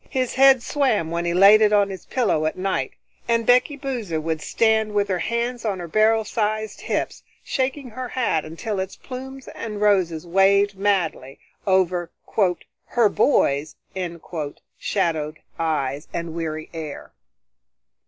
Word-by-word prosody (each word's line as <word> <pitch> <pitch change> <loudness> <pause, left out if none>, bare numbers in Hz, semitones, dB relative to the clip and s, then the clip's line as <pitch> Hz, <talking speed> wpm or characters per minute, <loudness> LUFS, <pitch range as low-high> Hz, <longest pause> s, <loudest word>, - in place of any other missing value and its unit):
His 255 -3 -1
head 265 -2 +6
swam 220 - +1
when 170 +1 -1
he 170 - 0
laid 200 +4 +8
it 210 -1 +5
on 205 -1 +3
his 190 - -9
pillow 200 -11 +1
at 155 - -3
night, 185 -8 -1 0.3
and 230 -1 +1
Becky 250 +5 +4
Boozer 240 - -3
would 160 0 -2
stand 220 +1 +1
with 205 0 +2
her 185 -2 0
hands 235 +5 -2
on 205 -4 -1
her 175 -1 -6
barrel 220 +4 +3
sized 215 0 -2
hips, - - -2 0.2
shaking 265 -1 -2
her 255 +3 -5
hat 230 -12 0
until 190 +6 -4
its 190 0 -4
plumes 265 +1 -9
and 210 -2 -6
roses 185 -6 +2
waved 195 +3 +3
madly, 185 -9 -1 0.3
over 180 -2 +2 0.8
"her 235 -3 +3
boy's" 150 - +2 1.0
shadowed 160 -5 -1 0.2
eyes 150 -3 -1
and 170 -1 -4
weary 155 -2 -4
air. 155 -3 -7
200 Hz, 145 wpm, -23 LUFS, 165-230 Hz, 1.0 s, laid